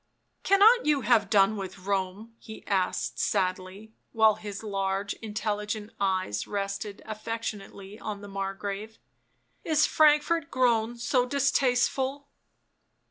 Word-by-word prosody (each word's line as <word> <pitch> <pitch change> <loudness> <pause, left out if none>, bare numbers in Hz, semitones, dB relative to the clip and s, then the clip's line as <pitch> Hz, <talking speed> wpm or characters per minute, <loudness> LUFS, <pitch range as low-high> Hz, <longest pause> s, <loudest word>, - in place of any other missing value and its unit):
" - - -48
Cannot 415 +2 +5
you 295 -2 +3
have 225 -5 +3
done 200 0 +4
with 190 -1 -7
Borne 200 +3 -2
?" - - -42
he 220 - -11
as^d 190 -2 -1
sadly, 190 +2 -2 0.2
while 220 -1 +5
his 210 0 -8
large 195 -1 -2
intelligent 210 0 -3
eyes 185 - -1
rested 200 +1 -4
affectionately 215 -2 -6
o.. 215 - -4
the 205 0 -11
Margrave. 195 +2 -5 0.4
" - - -44
Is 305 0 +5
Frankfort 305 +1 +3
grown 240 -3 +1
so 245 +1 +1
distasteful?" 275 +1 +1
215 Hz, 125 wpm, -27 LUFS, 195-245 Hz, 0.4 s, Cannot